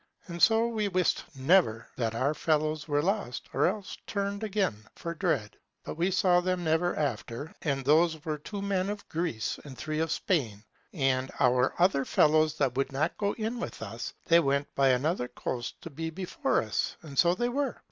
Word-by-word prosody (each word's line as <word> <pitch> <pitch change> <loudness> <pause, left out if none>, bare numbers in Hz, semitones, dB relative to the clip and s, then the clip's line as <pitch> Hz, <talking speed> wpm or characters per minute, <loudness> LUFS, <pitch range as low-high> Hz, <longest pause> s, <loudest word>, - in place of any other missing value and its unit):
And 170 -1 -6
so 225 +6 +5
we 220 -3 -1
wist 185 -2 +1
never, 140 -1 +4
whether 110 - -13 0.2
that 110 - -9
our 135 +5 +1
fellows 155 0 0
were 145 -1 +1
lost, 195 - -2
or - - +3
else 205 -3 -3
turned 200 +1 -2
again 190 - -1
for 170 - -5
dread. 150 - -1 0.3
But - - -5
we 170 +4 0
saw 185 -2 +3
them 180 0 -1
never 165 +2 +1
after; 145 -1 -3
and 135 -4 -1
those 160 +2 +3
were 155 -2 -2
two 200 +6 -6
men 195 -1 0
of 205 0 -5
Greece, 160 -10 -2
and 135 -3 -10
three 155 0 -3
of 160 0 0
Spain. 120 - -1 0.3
And 135 -5 +1
our 125 +1 +3
other 175 -6 +4
fellows 155 +3 +3
that 135 -4 +1
would 135 0 0
not 150 +5 0
go 200 -1 +1
in 225 +2 -3
with 235 - -5
us, 115 +2 -5
they 170 0 +6
went 140 -2 0
by 135 -1 +3
another 130 +1 +1
coast 120 -1 -5
to 165 - -8
be 160 +3 -4
before 180 -6 -1
us; 110 -2 -2
and 140 -4 -4
so 175 0 +5
they 240 +4 0
were. 275 +1 -1
160 Hz, 195 wpm, -29 LUFS, 135-185 Hz, 0.3 s, they